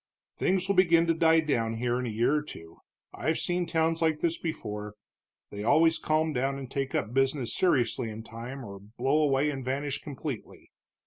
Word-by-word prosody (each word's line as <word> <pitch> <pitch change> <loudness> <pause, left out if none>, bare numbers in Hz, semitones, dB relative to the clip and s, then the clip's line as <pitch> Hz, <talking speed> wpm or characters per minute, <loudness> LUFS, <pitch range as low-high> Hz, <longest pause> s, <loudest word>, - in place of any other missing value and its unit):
"Things 185 0 0
will 200 - +2
begin 170 -3 +5
to 165 - +2
die 160 0 +4
down 115 -7 0
here 120 +1 0
in 125 - -2
a - - -2
year 115 +5 +1
or 150 - +2
two 80 - -11 0.3
I've 155 +1 -1
seen 175 0 -1
towns 165 0 +1
like 160 -2 +2
this 165 +1 -1
before, 105 -10 -5 0.6
they 105 0 -5
always 160 +7 +4
calm 155 0 +1
down 135 +1 0
and 135 -2 -8
take 135 -1 -2
up 110 +4 -1
business 135 -1 +1
seriously 125 -8 +1
in 110 +1 -7
time, 120 +4 -8
or 100 -2 -9
blow 125 +9 0
away 145 0 +2
and 135 -2 -5
vanish 135 +2 -2
completely. 140 -4 -7
135 Hz, 190 wpm, -28 LUFS, 120-160 Hz, 0.6 s, begin